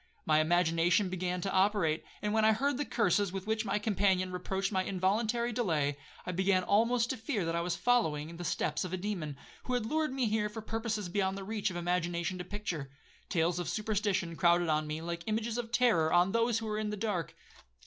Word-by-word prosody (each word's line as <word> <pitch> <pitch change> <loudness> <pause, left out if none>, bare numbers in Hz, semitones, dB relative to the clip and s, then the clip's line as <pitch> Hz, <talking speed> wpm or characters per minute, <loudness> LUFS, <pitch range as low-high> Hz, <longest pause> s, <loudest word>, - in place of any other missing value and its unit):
My 155 -1 +4
imagination 175 +3 +3
began 180 0 -2
to 195 - -2
operate, 190 -5 +2 0.2
and 210 0 0
when 220 0 +3
I 220 0 +6
heard 275 +4 0
the 290 - 0
curses 205 -6 +1
with 190 0 -5
which 220 +1 -1
my 200 0 0
companion 195 -3 +1
reproached 190 +2 -2
my 190 -2 +1
involuntary 220 +6 0
delay, 160 - 0 0.3
I 180 - -2
began 185 +1 +2
almost 230 +4 +2
to 260 - -3
fear 220 - -2
that 165 0 -1
I 170 - +1
was 175 0 -1
following 170 -7 +1
the 175 - -6
steps 155 -2 -1
of 185 -1 -5
a - - 0
demon, 175 -7 -4 0.3
who 250 - -1
had 240 -3 -1
lured 310 +5 0
me 260 -2 0
there 210 -1 0
for 220 +1 -7
purposes 220 -3 -2
beyond 190 +1 0
the 195 - -6
reach 210 +1 -1
of 185 - -7
imagination 175 +1 -1
to - - -3
picture. 180 -7 -5 0.4
Tales 175 0 +1
of 175 - -3
superstition 205 -5 -1
crowded 175 -1 +3
on 155 0 +1
me 155 +1 -4
like 170 0 -4
images 220 +2 -1
of 230 -1 -5
terror 215 -11 +3
on 175 +2 +4
those 230 +1 +2
who 225 0 -4
are 215 0 -2
in 215 -1 -2
the 210 - -4
dark. 195 - -2
195 Hz, 215 wpm, -31 LUFS, 175-220 Hz, 0.4 s, I